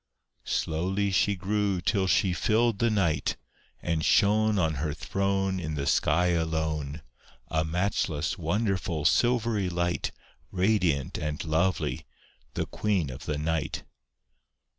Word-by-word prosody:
Slowly 95 +5 0
she 100 +2 +2
grew 100 0 0
till 95 +2 +1
she 95 -1 +3
filled 110 +2 +1
the 115 - +3
night, 85 -9 0 0.5
And 80 -2 0
shone 105 +4 +3
On 80 -4 +2
her 75 -2 -2
throne 95 +2 -1
In 80 -3 -4
the 70 -1 -2
sky 90 +5 +2
alone, 80 -3 -1 0.5
A 80 -1 +1
matchless, 80 -2 -1
wonderful, 90 -3 -1
silvery 115 -2 +2
light, 85 0 -1 0.4
Radiant 90 -7 +1
and 75 0 -3
lovely, 85 +4 0 0.5
the - - -1
Queen 95 -10 -1
of 65 - -9
the 75 - -1
night. 80 0 -2
90 Hz, 120 wpm, -28 LUFS, 80-100 Hz, 0.5 s, she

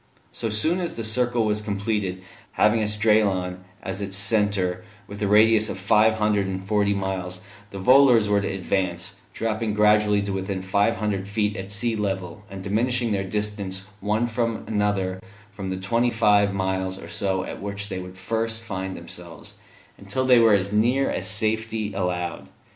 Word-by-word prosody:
So 115 - -3
soon 155 - +2
as 175 -2 -3
the 115 - -4
circle 120 +1 +1
was 105 0 +1
completed, 100 -3 -2 0.3
having 110 +2 +3
Esdraelon 105 -4 +1 0.2
as 95 +1 -4
its 100 -1 -1
centre 100 -3 +1 0.2
with 100 +1 -10
a 105 - +1
radius 110 +1 +5
of - - -4
five 105 +3 +3
hundred 105 -2 +1
and 95 0 -4
forty 100 0 +2
miles, 95 -1 -3 0.3
the 100 - -8
volors 125 +1 +5
were 100 0 +2
to 100 - -2
advance, 95 0 -2
dropping 110 -1 -2
gradually 105 -1 +4
to 100 -1 -3
within 95 0 -3
five 100 +4 +2
hundred 100 -3 -2
feet 105 0 -1
of 95 0 -6
sea 115 +3 0
level, 95 -3 -3
and 95 -1 -8
diminishing 120 +3 0
their 100 -1 0
distance 100 -2 -3
one 105 +3 0
from 115 -1 -2
another 100 -3 -1 0.3
from 100 -1 -6
the 95 - -2
twenty 115 +6 +1
five 105 -3 +3
miles 95 -1 -2
or - - -10
so 95 -2 -1
at - - -7
which 100 0 -4
they 95 -2 -4
would 90 0 -9
first 115 +3 -2
find 95 -3 -5
themselves, 85 -2 -10 0.4
until 100 +6 -2
they 125 -2 +6
were 115 -2 +6
as 100 0 +1
near 120 +6 +2
as 95 - -2
safety 110 +1 -1
allowed. 90 -2 -3
105 Hz, 170 wpm, -24 LUFS, 95-110 Hz, 0.4 s, they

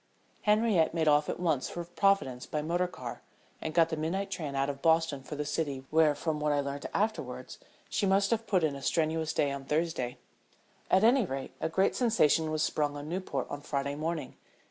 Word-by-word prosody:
Henriette 210 -6 +3
made 160 -1 +1
off 150 0 +4
at - - -3
once 160 -7 0
for 175 0 -5
Providence 175 -8 +1
by 150 -1 -2
motor 175 +3 0
car, 125 -9 -8 0.4
and 160 - -3
got 165 -1 +5
the 160 - -1
midnight 190 +6 -2
train 155 -7 -4
out 135 0 +1
of 140 -1 -4
Boston 160 -4 +2
for 140 +3 -7
the 150 0 -3
city 140 -3 -2
where, 155 -2 +4
from 155 0 -2
what 150 0 +1
I 145 - +2
learned 140 0 -3
afterwards, 215 +2 -2 0.3
she 200 - 0
must 195 +2 +3
have 230 -1 0
put 185 -5 +2
in 155 -2 +2
a 140 - -8
strenuous 160 +1 0
day 145 -3 +1
on 140 -1 -5
Thursday. 150 -5 -1 0.7
At 190 - +4
any 245 +3 +5
rate, 135 -2 -4
a - - 0
great 190 +4 +2
sensation 165 - +3
was 155 0 0
sprung 145 -1 0
on 145 +1 -7
Newport 170 -7 -2
on 145 - -4
Friday 140 -1 -2
morning. 155 -1 -4
160 Hz, 205 wpm, -30 LUFS, 145-180 Hz, 0.7 s, got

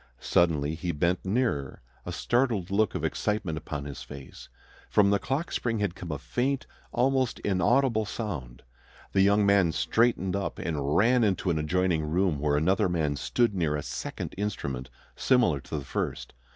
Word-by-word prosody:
Suddenly 80 -3 +2
he 85 +2 -3
bent 85 +4 0
nearer, 95 - -1 0.2
a - - -3
startled 120 -7 0
look 105 +1 +2
of - - -1
excitement 105 -6 -1
upon 75 -2 -5
his 70 -1 -7
face. 70 -2 -10 0.4
From 100 -1 +4
the 100 - +3
clock 135 - -2
spring 115 -2 -1
had 100 -4 -1
come 90 -2 -7
a 75 - -2
faint, 130 - -1 0.3
almost 130 -1 +1
inaudible 110 +4 +2
sound. 90 - -5 0.5
The 95 - +3
young 100 +1 +4
man 100 -4 +4
straightened 95 +4 +1
up 100 0 -3
and 75 -3 -1
ran 120 +3 +4
into 95 -3 +1
an 80 - 0
adjoining 85 +1 +1
room, 80 0 +1
where 75 0 +1
another 95 +6 +2
man 80 -4 0
stood 105 - +1
near 80 -6 0
a 75 - -3
second - - -5
instrument 70 -11 -3 0.3
similar 120 - +3
to 70 - -6
the 70 - -5
first. - - -3
95 Hz, 165 wpm, -28 LUFS, 75-110 Hz, 0.5 s, From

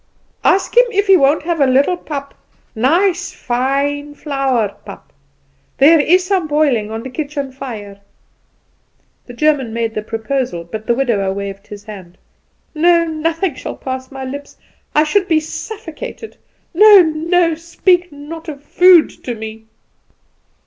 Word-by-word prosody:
"Ask 390 - +2
him - - +6
if 405 -1 +1
he 390 -1 +6
won't 290 -2 +3
have 335 -2 -1
a 275 - +5
little 275 +7 +3
pap 280 -5 -7 0.4
nice, 355 - +1
fine, 280 +3 -2
flour 270 -7 -1
pap. - - -12 0.6
There 310 +4 +6
is 360 +5 +3
some 370 -4 0
boiling 285 -8 +1
on 225 +1 -5
the 260 - -6
kitchen 285 -1 -4
fire." 215 -7 -8 1.3
The 245 - -10
German 280 -4 +1
made 230 -1 -2
the 215 - -3
proposal, 225 -3 -3
but 215 +6 -8
the 235 - +2
widower 225 -7 0
waved 200 0 -6
his 205 -1 -10
hand. 190 -5 -11 0.6
"No, 340 +1 +3
nothing 330 +2 -2
shall - - -7
pass 260 0 -6
my 270 -1 -7
lips. 285 +2 -8 0.4
I 300 - +5
should 375 +5 +1
be 320 -4 +3
suffocated. 440 +7 -8 0.4
No, 415 +2 +8
no! 330 +2 +1
Speak 350 +2 0
not 315 +3 -9
of 285 -2 -9
food 355 +2 +5
to 245 - -4
me!" 220 0 -9
285 Hz, 145 wpm, -17 LUFS, 240-335 Hz, 1.3 s, No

